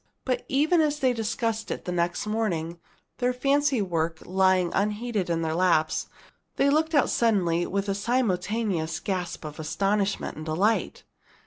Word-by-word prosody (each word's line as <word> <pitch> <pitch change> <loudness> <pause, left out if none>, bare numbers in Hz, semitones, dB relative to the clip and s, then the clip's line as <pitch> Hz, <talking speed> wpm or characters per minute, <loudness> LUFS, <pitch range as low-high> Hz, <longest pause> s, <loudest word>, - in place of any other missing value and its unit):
But 250 -2 -1
even 310 +5 +3
as 300 -1 +1
they 260 -3 +2
sat - - -3
discussing 225 0 -2
it - - -20
next 175 +1 -1
morning, 175 -7 -2 0.4
their 250 0 +2
fancy 275 -2 +2
work 165 -3 -1
lying 185 -1 +2
unheeded 210 -1 -1
in 165 -1 0
their 160 -1 -1
laps, 165 -3 +1 0.5
they 280 - +3
looked 315 +2 +1
out 285 - +3
suddenly 180 -7 +2
with 200 +1 -2
a 195 - +1
simultaneous 205 -5 -1
gasp 180 -5 -4
of 150 0 -8
astonishment 195 +6 -1
and 155 - -7
delight. 195 +8 0
200 Hz, 150 wpm, -26 LUFS, 170-240 Hz, 0.5 s, even